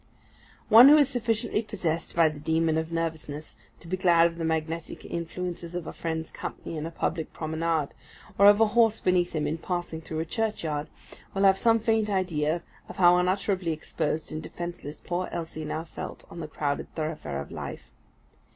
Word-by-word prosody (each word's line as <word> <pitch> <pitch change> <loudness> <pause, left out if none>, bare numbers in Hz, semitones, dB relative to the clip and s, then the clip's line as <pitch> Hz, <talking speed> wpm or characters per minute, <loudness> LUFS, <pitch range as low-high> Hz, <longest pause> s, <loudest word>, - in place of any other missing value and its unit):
One 235 +5 +10
who 300 - +9
is 285 -3 +4
sufficiently 230 -3 0
possessed 175 -7 -3
by 165 -1 +6
the 155 -1 -4
demon 160 +1 +1
of 160 +1 -4
nervousness 160 -2 -4 0.3
to 170 - -10
be 185 +2 -1
glad 170 -2 +5
of 170 0 -1
the - - -2
magnetic 160 0 -3
influences 170 0 -5
of 175 -2 -3
a - - -6
friend's 160 -1 -4
company - - -6
in 155 +1 -3
a - - -4
public 165 -1 -3
promenade, 160 -1 -1 0.5
or 200 - +8
of 205 +1 +7
a 225 -1 +5
horse 225 -2 +4
beneath 180 -1 +1
him 155 -2 -1
in 155 +3 -2
passing 175 -2 -3
through 160 0 -5
a - - -3
churchyard, 165 -7 -2 0.5
will 195 - +1
have 195 -1 +5
some 230 -1 +5
faint 220 -1 +1
idea 170 -4 0 0.3
of - - -9
how 175 -1 +7
utterly 185 0 +1
exposed 155 0 -3
and 155 - -4
defenceless 170 -4 -7
poor 180 +1 -3
Elsie 160 -2 -5
now 155 +1 -3
felt 165 - -8
on - - -8
the 155 - -5
crowded 145 -2 -3
thoroughfare 155 - -3
of 70 - -7
life. - - -7
165 Hz, 185 wpm, -27 LUFS, 160-185 Hz, 0.5 s, One